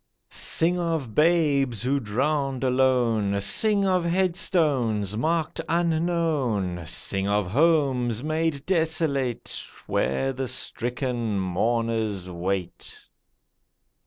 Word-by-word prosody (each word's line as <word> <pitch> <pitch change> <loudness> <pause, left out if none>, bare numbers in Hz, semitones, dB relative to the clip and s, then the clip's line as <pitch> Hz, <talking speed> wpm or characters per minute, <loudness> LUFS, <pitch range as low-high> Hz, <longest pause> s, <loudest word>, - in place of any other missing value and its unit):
Sing 175 +2 +3
of 160 -9 -2
babes 145 - +2
who 140 +3 +1
drowned 135 +4 -1
alone; 125 -6 +2
Sing 200 - +3
of 185 -2 +2
headstones, 160 - 0
marked 160 +7 -1
'Unknown'; 160 - 0
Sing 95 +5 -1
of 105 0 +1
homes 130 -5 +2
made 155 -2 -1
desolate 160 -8 0 0.2
Where 100 - -1
the 130 0 -4
stricken 120 -3 -2
mourners 110 +1 -1
wait. 90 +1 -5
130 Hz, 90 wpm, -25 LUFS, 110-160 Hz, 0.2 s, Sing